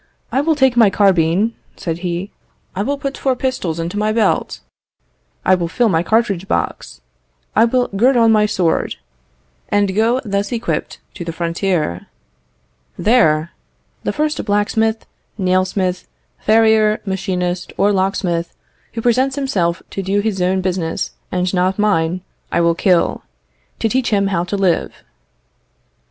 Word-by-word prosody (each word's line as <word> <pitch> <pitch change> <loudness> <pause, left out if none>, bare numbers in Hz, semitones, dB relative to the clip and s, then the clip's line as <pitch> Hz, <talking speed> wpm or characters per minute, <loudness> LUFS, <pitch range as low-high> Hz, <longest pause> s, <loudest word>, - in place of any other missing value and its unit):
"I 270 - +2
will 320 +2 +2
take 265 -4 +3
my 230 -4 +6
carbine," 195 +2 +2 0.2
said 165 -1 -4
he; 180 +2 -3 0.4
"I 190 - -1
will 280 +7 -1
put 275 0 -5
four 265 -2 +1
pistols 245 -11 -2
into 170 +5 -3
my 215 +1 +1
belt; 220 0 0 0.8
I 185 - +5
will 175 -2 +1
fill 235 +7 +1
my 165 -3 +2
cartridge 200 -2 0
box; - - -3 0.5
I 225 - +6
will 245 +1 +1
gird 245 +7 +3
on 230 -1 +5
my 210 -1 +4
sword, 180 -5 0 0.7
and 205 -2 +1
go 230 +4 +2
thus 200 -1 -1
equipped 235 -1 -2 0.2
to 175 - -7
the 170 - -4
frontier. 170 - -2 0.9
There, 170 -9 +3 0.5
the - - 0
first 305 0 -1
blacksmith, 220 +2 0 0.3
nail 185 -1 +2
smith, 185 -1 -2 0.3
farrier, 220 -1 +3
machinist, 180 -2 -2
or 200 +1 +3
locksmith, 185 -3 -1 0.4
who 225 - -4
presents 260 +3 +2
himself 190 -12 -1
to 195 - -3
do 195 +2 0
his 205 -3 -1
own 185 +1 +1
business 180 -3 -2 0.2
and 180 0 -1
not 185 +1 +1
mine, 185 -4 +1 0.3
I - - +1
will 170 0 +3
kill, 180 0 +2 0.6
to - - 0
teach 250 +2 0
him 200 -2 +2
how 170 -1 0
to 200 +3 -3
live." 190 -3 0
195 Hz, 145 wpm, -18 LUFS, 180-225 Hz, 0.9 s, my